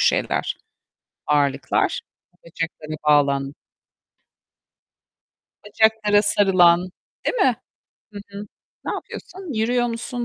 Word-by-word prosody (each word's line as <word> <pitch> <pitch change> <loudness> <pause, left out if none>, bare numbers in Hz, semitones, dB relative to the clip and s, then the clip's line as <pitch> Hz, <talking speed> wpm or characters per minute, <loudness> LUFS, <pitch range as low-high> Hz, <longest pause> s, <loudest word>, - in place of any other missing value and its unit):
şeyler - - +1 0.7
ağırlıklar 145 -2 +1 0.4
bacaklara 160 -2 -5
bağlan 140 -1 +3 2.1
Bacaklara 210 -1 +3
sarılan, 185 -3 +4 0.3
değil - - 0
mi? 265 - +3 0.6
Hı 205 - -7
hı. 200 +1 -8 0.4
Ne - - -2
yapıyorsun? 370 -5 -8
Yürüyor 240 +2 +1
musun? 240 +1 -4
205 Hz, 80 wpm, -22 LUFS, 155-230 Hz, 2.1 s, sarılan